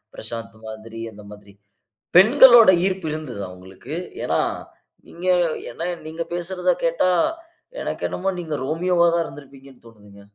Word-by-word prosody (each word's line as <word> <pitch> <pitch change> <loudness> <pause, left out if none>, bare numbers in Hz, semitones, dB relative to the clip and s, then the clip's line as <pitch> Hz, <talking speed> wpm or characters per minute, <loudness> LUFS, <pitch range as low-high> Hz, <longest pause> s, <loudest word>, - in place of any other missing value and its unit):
பிரசாந்த் 110 -2 -7
மாதிரி 110 +1 -9
அந்த 105 0 -14
மாதிரி 105 -1 -14 0.6
.பெண்களோட 235 +2 +8 0.2
ஈர்ப்பு 190 -3 -2
இருந்ததா 130 -11 -6
உங்களுக்கு? 95 +10 -10 0.3
ஏன்னா - - 0 0.7
நீங்க 175 +2 -10 0.5
என்ன - - -11 0.3
நீங்க 160 +1 -4
பேசுறத 180 +1 -1
கேட்டா - - +2 0.7
எனக்கு - - -4
என்னமோ 195 - -2
நீங்க 160 -3 -4
ரோமியோ 175 +5 -1
வா 170 - +6
தான் 170 0 +1
இருந்திருப்பீங்கன்னு 135 -2 -14
தோனுதுங்க. 105 -3 -16
150 Hz, 130 wpm, -22 LUFS, 110-180 Hz, 0.7 s, பெண்களோட